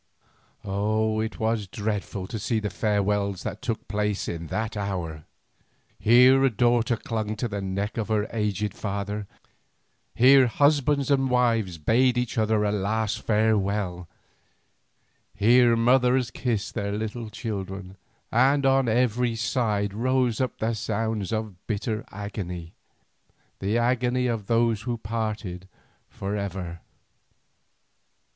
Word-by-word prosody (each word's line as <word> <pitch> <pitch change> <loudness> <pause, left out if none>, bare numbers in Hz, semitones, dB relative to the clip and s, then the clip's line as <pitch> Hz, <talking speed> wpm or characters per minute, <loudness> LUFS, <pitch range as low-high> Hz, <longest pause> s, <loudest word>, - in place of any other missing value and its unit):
Oh! 110 +2 0
it 110 0 -3
was 110 -2 0
dreadful 100 -1 -3
to 110 +3 -5
see 110 +2 0
the 105 -2 -3
farewells 100 -3 0
that 105 -2 -5
took 115 -3 -3
place 105 -1 -1
in 85 -1 -4
that 110 +6 -3
hour. 90 -7 -4 0.7
Here 125 +4 +6
a 135 - +5
daughter 120 +1 +2
clung 110 -1 -3
to 115 +3 -2
the 100 -2 -4
neck 100 +3 -3
of 110 - -1
her 110 -1 0
aged 105 -2 -1
father, 100 0 -4 0.9
here 130 +2 +7
husbands 145 +1 +2
and 135 -1 +2
wives 115 -7 +1
bade 120 +10 +2
each 125 -2 -1
other 110 -1 +2
a 105 - +1
last 105 +2 -1
farewell, 100 -5 0 1.3
here 120 +3 +5
mothers 125 +1 +3
kissed 115 -5 -2
their 100 -2 -2
little 110 +2 -4
children, 95 -4 -5 0.4
and 135 +4 +3
on 135 -2 +3
every 120 0 +1
side 110 -4 0
rose 125 +1 +1
up 130 - -2
the 115 +1 -1
sounds 110 -1 -2
of 110 -5 -4
bitter 110 +1 -2
agony, 90 -4 -6 0.9
the 100 +4 0
agony 125 +1 +1
of 115 -5 -2
those 115 -2 +2
who 120 +1 -3
parted 105 -4 -4 0.4
for 100 +1 -4
ever. 95 -4 -4
110 Hz, 125 wpm, -25 LUFS, 100-120 Hz, 1.3 s, here